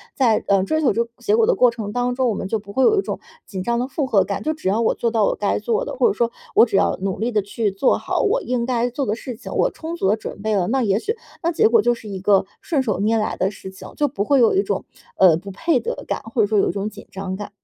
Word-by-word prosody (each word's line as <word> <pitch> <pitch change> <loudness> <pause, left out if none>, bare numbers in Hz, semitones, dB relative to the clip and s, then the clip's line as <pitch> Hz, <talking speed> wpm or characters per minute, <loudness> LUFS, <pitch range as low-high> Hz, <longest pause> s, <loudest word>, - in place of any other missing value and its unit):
在， 235 -5 +2
呃， 195 -1 +3
追 315 +10 0
求 275 - +3
这 235 - +1
个 235 - -16
结 415 - +1
果 455 0 +4
的 - - +3
过 250 - +5
程 220 -3 -6
当 245 +1 -1
中， 260 -1 +1
我 - - 0
们 190 - -4
就 220 +2 -1
不 200 0 -12
会 265 - +2
有 430 - +4
一 - - +3
种 - - -5 0.3
紧 190 -2 -6
张 235 +3 0
的 250 - -1
负 285 +1 -2
荷 200 -7 +3
感。 195 +1 -4
就 310 +1 0
只 310 - -6
要 215 +4 +1
我 225 - +2
做 235 - -1
到 220 -2 +2
我 - - +1
该 205 - 0
做 475 +1 -1
的， - - -5
或 485 - +3
者 420 - +1
说 235 -6 0 0.2
我 - - +8
只 220 - -3
要 - - +2
努 190 -1 -2
力 235 +3 -1
地 210 - +2
去 205 +1 -2
做 195 +7 +2
好 - - -1
我 480 +2 +1
应 245 - -1
该 245 -1 0
做 270 +3 -3
的 215 -1 -1
事 245 +1 -7
情， 230 - -10
我 - - +2
充 330 +1 -6
足 265 - -1
地 210 - +4
准 220 - -8
备 215 0 0
了， 180 -3 +1
那 265 +4 +1
也 205 -1 +2
许 445 - -2 0.3
那 335 - +2
结 440 +7 +4
果 455 - +5
就 240 - +2
是 225 - -10
一 195 - -5
个 195 0 +3 0.2
顺 300 -5 0
手 210 -6 -1
拈 220 +3 +2
来 215 - -1
的 190 - 0
事 190 -1 -10
情， 190 - -11
就 295 - +1
不 250 -7 -2
会 275 +5 +3
有 235 +6 +4
一 390 - +3
种， - - -3 0.3
呃， 185 -4 +6
不 195 +3 -9
配 310 - +1
得 225 - -5
感， - - -2
或 225 +1 -1
者 205 - +3
说 215 0 +1
有 - - +2
一 - - +1
种 200 +1 -3
紧 210 -1 -13
张 190 -1 -5
感。 205 +1 -7
230 Hz, 340 characters per minute, -21 LUFS, 200-270 Hz, 0.3 s, 我